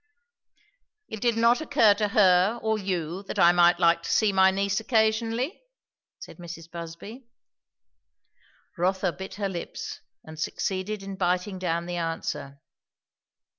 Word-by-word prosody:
"It 220 - -7
did 235 -2 +1
not 235 +3 +3
occur 275 -9 +4
to 210 +1 -1
her 195 +2 +3
or 220 -1 0
you 180 -2 -3
that - - -5
I 170 - +6
might 175 0 +4
like 170 -1 +3
to - - -7
see 215 -3 +3
my 190 0 +5
niece 195 0 0
occasionally?" 225 - 0 0.6
said 485 - -12
Mrs. 170 -2 -10
Busby. 175 +9 -9 1.5
Rotha 185 +1 +1
bit 190 +2 -9
her 200 0 -2
lips 175 -3 -6 0.2
and 155 0 -11
succeeded 195 +5 -3
in 195 -1 -7
biting 180 +1 -1
down 170 -2 -2
the 175 0 -4
answer. 165 -4 -4
190 Hz, 135 wpm, -26 LUFS, 175-220 Hz, 1.5 s, I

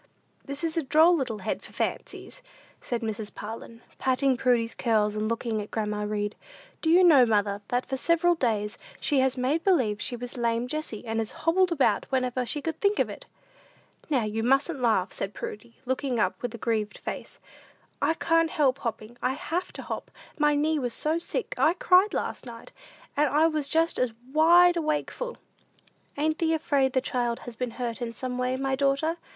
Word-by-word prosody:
"This 280 +3 -6
is 325 -1 -1
a - - +3
droll 315 +5 +5
little 255 -8 -2
head - - -2
for - - -14
fancies," - - -4 0.4
said 240 -1 -3
Mrs. 220 -1 -4
Parlin, 230 +2 -8 0.2
patting 260 0 +2
Prudy's 240 -2 +1
curls, 215 -3 +1
and 215 +1 -1
looking 230 -1 -1
at 205 - -8
grandma 210 -1 -2
Read. 210 0 -2 0.5
"Do 320 - 0
you 355 +3 +6
know, 305 -8 +7
mother, 205 -3 +1
that 245 +1 0
for 265 - -3
several 335 +4 +3
days 220 -9 -1 0.2
she 285 -3 +2
has 260 0 +2
made 275 +6 0
believe 240 - +2
she 245 - 0
was 245 +1 -7
lame 235 0 0
Jessie, 275 -6 -4
and 225 0 -2
has 220 -1 -1 0.2
hobbled 360 +2 +3
about 265 -10 +2
whenever 255 -1 0
she 295 +2 -1
could 325 -1 -4
think 405 0 +2
of - - +1
it." - - -10 0.8
"Now 265 -6 +2
you 215 +1 -2
mustn't 270 +4 +1
laugh," 220 -6 +2
said 195 +1 -4
Prudy, 230 +3 -7
looking 260 -1 -1
up - - +2
with 245 -1 -4
a - - -6
grieved 215 -2 -1
face; - - -7 0.6
I 325 - +2
can't 330 0 +2
never - - -9
help 275 -3 +3
hopping; 230 -1 -5
I 255 - +1
have 335 +5 -3
to - - -6
hop. - - -5 0.3
My 295 0 +4
knee 305 +1 +1
was 245 -3 -2
so 315 +2 0
sick, 395 - -3
I 320 - +5
cried 370 +3 +4
last - - -3
night, 230 -1 -10 0.4
and 295 0 +3
I 300 +4 +4
was 305 -3 0
just 325 +2 +1
as 250 -3 +1 0.2
wide 345 +3 +6
awakeful!" 320 +10 -2 0.8
"Ain't 310 +2 0
thee 325 -1 +2
afraid 280 -4 +1
the 260 - +2
child 240 -2 -1
has 245 -2 -9
been 250 +2 -2
hurt 240 -2 -3
in 235 -1 -2
some 250 +1 -4
way, 250 +1 0
my 270 0 0
daughter?" 280 +4 +1
260 Hz, 195 wpm, -27 LUFS, 230-315 Hz, 0.8 s, know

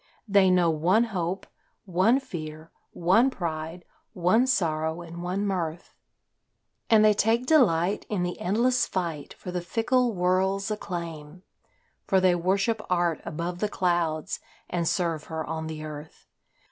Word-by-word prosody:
They 195 -2 +5
know 180 -2 +4
one 175 +8 +3
hope, 190 -4 -3 0.4
one 195 +8 +3
fear, 160 - -8 0.2
one 190 +10 +3
pride, 165 -4 -5 0.3
one 185 +8 +3
sorrow 160 -7 0
and 170 0 -9
one 185 +3 -2
mirth, 175 -4 -3 1.0
And 215 -1 +6
they 215 - +6
take 225 +4 +1
delight 205 - +3
in 200 -4 -1
the 175 0 -3
endless 240 +7 +2
fight 165 -6 -4
for 180 - -8
the 180 0 -2
fickle 235 +5 +1
world's 190 +3 +1
acclaim; 170 -4 -6 0.6
For 190 - +4
they 185 -1 +4
worship 195 +5 +1
art 175 -3 +1
above 170 +3 -4
the 210 - 0
clouds 170 -5 -1 0.3
and 170 -2 -1
serve 165 -4 -1
her 160 -1 -4
on 160 0 -4
the 155 -1 -6
earth. 150 0 -9
180 Hz, 140 wpm, -26 LUFS, 165-200 Hz, 1.0 s, And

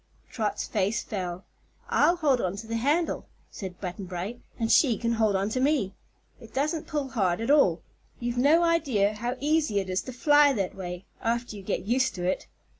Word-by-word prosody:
Trot's 215 -3 -2
face 205 +1 0
fell. 185 -2 -5 0.4
"I'll 345 - +4
hold 285 -7 +2
on 185 +1 -1
to 210 +3 -7
the 230 +1 -2
handle," 295 +8 0 0.2
said 185 -3 -7
Button 185 +1 -5
Bright, 185 +6 -5 0.2
"and 225 -1 0
she 245 -8 +5
can 230 +2 -1
hold 220 -3 +2
on 195 +2 0
to 255 - -1
me. 260 -8 +1 0.5
It 230 -2 -14
doesn't 300 +4 -1
pull 295 -4 -2
hard 185 -8 0
at 230 +4 0
all. 190 - +4 0.4
You've 240 0 -2
no 305 +6 +5
idea 265 -12 +2
how 240 +4 -3
easy 300 -6 +1
it 190 -1 -4
is 185 - 0
to 255 - -5
fly 290 +3 +5
that 195 -6 -2
way 180 -1 -6 0.2
after 235 0 -1
you 200 - -8
get 185 - -3
used 250 +3 +1
to 180 - -5
it." 185 - -1
230 Hz, 195 wpm, -27 LUFS, 195-275 Hz, 0.5 s, she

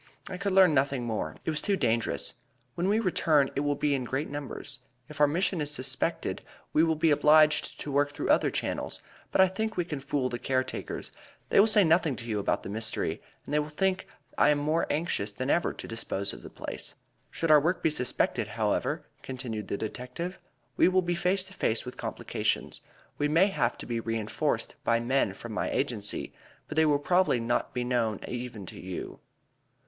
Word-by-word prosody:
"I 180 - -5
could 200 -1 -1
learn 185 -4 +7
nothing 135 -3 +1
alone. 105 -9 -3
It - - +1
was 150 - -1
too 200 - +1
dangerous. 115 -6 0 0.4
When 175 +2 -1
we 215 +2 +3
return, 160 -8 +2
it - - +1
will 145 0 +1
be 145 0 +1
in 135 -2 0
greater 135 +5 -3
numbers. 140 -1 -5 0.3
If 150 -1 -6
our 150 - +7
mission 170 +3 +1
is 145 - 0
suspected 130 -2 -1 0.3
we 155 - +5
will 160 -1 +2
be 160 +1 +3
obliged 150 +1 +4
to 145 - -4
work 145 +1 +2
through 145 - -4
other - - +4
channels, - - -3 0.3
but - - +4
I 190 - +7
think 220 +3 -3
we 175 - +1
can 150 -4 -4
fool 135 -1 -1
the 120 -1 -4
care 130 0 +1
takers; 130 - -5 0.4
they - - +5
will 205 - +7
say 210 -2 +6
nothing 165 -4 +3
to 115 - -7
you 110 -3 -1
about 100 - 0
the - - -6
mystery, 110 +2 -1 0.2
and - - -6
they 150 - +4
will 150 0 -2
think 190 +4 0 0.2
that - - -4
I - - +7
am 150 - +4
more 155 +3 +1
anxious 150 - 0
than 130 +7 -2
ever 170 - +2
to - - -8
dispose 100 -3 -2
of - - -10
the - - -10
place. - - -6 0.3
Should 165 -1 0
our 150 - +9
work 175 +4 0
be 160 - +3
suspected, 125 -4 0
however," - - -1 0.2
continued 120 -6 -4
the - - -2
detective, 125 - -5 0.4
"we - - +6
will 185 0 +3
be 175 0 0
face 185 +2 +1
to 190 +1 -10
face 110 - -1
with 125 - -7
complications. - - -2 0.4
We 145 - +2
may 165 +7 +4
have 125 -10 0
to - - -7
be 115 -1 -2
reënforced 115 -2 -1
by 115 0 +3
men 120 -4 +1
from 120 - -8
my 105 - -1
agency, 115 -7 -2 0.3
but - - -6
they 160 0 +4
will 145 -1 +4
probably 175 -2 +2
not 115 +1 0
be 125 - 0
known 120 -4 0
even 120 -5 -5
to - - -10
you." 90 -1 -6
145 Hz, 210 wpm, -29 LUFS, 120-165 Hz, 0.4 s, our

